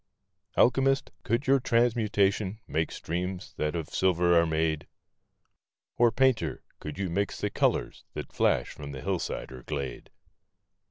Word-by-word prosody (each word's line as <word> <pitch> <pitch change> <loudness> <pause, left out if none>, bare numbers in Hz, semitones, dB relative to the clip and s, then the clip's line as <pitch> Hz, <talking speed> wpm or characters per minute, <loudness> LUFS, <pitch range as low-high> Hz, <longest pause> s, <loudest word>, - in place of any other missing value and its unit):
Alchemist, 135 +2 +3
could 115 +6 0
your 135 +1 +5
transmutation 110 -4 +2
make 80 +1 -1
streams 90 +2 -4
that 75 +1 -1
of 80 -3 -3
silver 90 -2 +3
are 85 0 +5
made? 80 -1 0 1.1
Or, 120 -1 +5
Painter, 130 -1 +1 0.2
could 75 +2 -7
you 95 -1 -1
mix 100 +3 -1
the - - -1
colors - - 0
that - - -6
flash - - +2
from 70 -1 -8
the 65 - -6
hillside - - -2
or 65 -1 -9
glade? 65 0 -5
95 Hz, 140 wpm, -28 LUFS, 80-115 Hz, 1.1 s, your